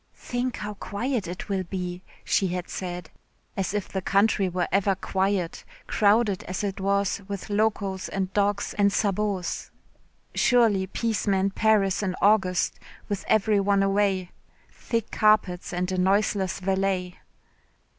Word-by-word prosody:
"Think 245 0 -3
how 210 0 -5
quiet 215 +1 -3
it 175 +2 -6
will 195 -2 0
be," 180 -1 -5 0.2
she 195 - +2
had 180 0 -4
said. 175 -3 -5 0.4
As 195 -2 -1
if 205 -1 -2
the 190 - -3
country 200 0 +2
were 180 0 -1
ever 195 0 +2
quiet, 190 -2 -1 0.2
crowded 210 -1 +3
as 185 +3 -4
it 195 -1 -3
was 200 0 +1
with 200 +1 -6
locos 205 -2 0
and 190 -1 -3
dogs 205 0 0
and 200 0 +5
sabots. 200 -3 -1 0.6
Surely 225 -6 +3
peace 220 +1 -2
meant 195 0 +2
Paris 210 -4 +2
in 185 -3 -1
August, 195 -3 +2 0.3
with 205 -2 -2
every 215 -1 +3
one 200 0 +2
away, 195 -2 +1 0.4
thick 230 -2 -3
carpets 215 -5 +2
and 180 +1 -2
a 185 - -1
noiseless 195 0 +1
valet. 190 -1 -1
195 Hz, 140 wpm, -26 LUFS, 185-205 Hz, 0.6 s, and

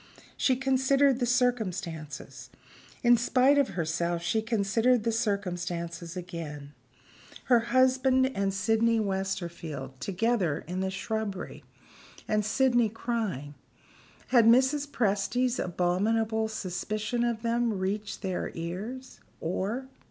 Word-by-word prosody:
She 260 - +2
considered 270 0 +3
the 245 - 0
circumstances. 180 - -2 0.5
In 240 0 +6
spite 255 +4 +4
of 265 -10 0
herself, 170 +1 -1
she 220 +5 +1
considered 225 +2 +2
the 230 - +1
circumstances 175 -6 -3
again. 155 -5 -7 0.7
Her 245 -2 +4
husband 260 +1 +3
and 195 0 0
Sydney 225 +4 +2
Westerfield 170 -9 -4
together 195 -5 0
in 180 +2 -3
the 190 0 0
shrubbery 200 0 -4 0.6
and 215 -1 +1
Sydney 240 +1 +2
crying. 215 - -3 0.8
Had 240 -3 +5
Mrs. 265 +5 +4
Presty's 240 +2 0
abominable 220 +6 0
suspicion 215 +3 -3
of 235 -1 -1
them 235 -2 +1
reached 200 +3 -3
their 185 -2 -2
ears? 205 +11 -6 0.2
or? 200 +10 -2
215 Hz, 105 wpm, -28 LUFS, 180-240 Hz, 0.8 s, In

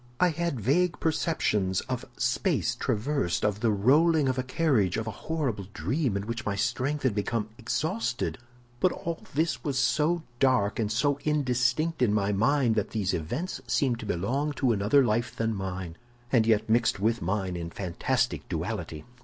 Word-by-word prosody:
I 180 - +5
had 170 -4 -2
vague 165 - +1
perceptions 105 - 0
of - - -4
space - - +1
traversed, 115 - -1
of 105 -1 0
the 115 - +2
rolling 145 +9 +4
of 130 0 0
a - - +3
carriage, 125 - +1
of 110 - -2
a 110 - -3
horrible 125 - -3
dream 130 -7 0
in 100 - -4
which 115 +1 -4
my 105 -3 -1
strength 130 +7 -1
had 130 -5 +2
become 105 +1 -1
exhausted; 135 - -2 0.4
but 185 - +3
all 170 -1 -5
this 160 +2 0
was 140 -3 -1
so 150 +7 +2 0.2
dark 125 -7 +2
and 110 -2 0
so 140 +5 +1
indistinct 145 +1 +1
in 110 -4 +3
my 100 -1 +1
mind 120 +4 +2
that 105 -2 -1
these 105 -4 -1
events 125 - -3
seemed 125 -5 +1
to 110 - -7
belong 130 - -1
to 130 -3 +1
another 110 +6 +3
life 120 +1 0
than 115 0 0
mine, 95 -4 -5 0.4
and 115 -4 +4
yet 110 -1 +3
mixed 115 -2 +2
with 115 +3 +1
mine 95 0 -1
in 85 -1 -4
fantastic 85 0 -1
duality. 75 -1 -4
120 Hz, 170 wpm, -28 LUFS, 105-145 Hz, 0.4 s, I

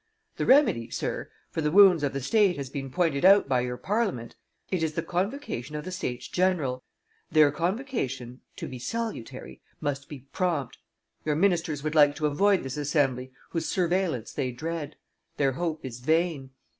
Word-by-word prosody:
The - - -1
remedy, 235 - +4
sir, - - -3 0.2
for 160 - -2
the 150 - +1
wounds 185 -1 +7
of 145 -2 0
the 140 - -4
state 200 - +3
has 135 -2 -5
been 135 -2 -5
pointed 160 -2 0
out 195 -1 +7
by 130 -2 +2
your 125 0 -3
Parliament: 195 - -2 0.4
it 185 -3 0
is 160 -1 0
the 165 - -2
convocation 180 - -3
of 150 - -5
the 185 - -5
Statesgeneral. 135 -2 -1 0.5
Their 150 -2 +5
convocation, 165 - -3
to - - -6
be 130 -1 -7
salutary, 130 - -5 0.2
must 140 -1 -3
be 145 -4 -8
prompt. 160 -9 -1 0.4
Your 150 -1 0
ministers 165 -4 +1
would 155 0 -2
like 145 -2 +5
to 155 - -2
avoid 195 +6 +3
this 135 +1 -5
assembly 135 -4 0 0.2
whose 165 - -2
surveillance 175 - 0
they 130 - -2
dread. 155 +3 -5 0.4
Their 140 -2 +2
hope 160 +1 -3
is 125 -2 -6
vain. 155 0 0
155 Hz, 170 wpm, -27 LUFS, 135-180 Hz, 0.5 s, wounds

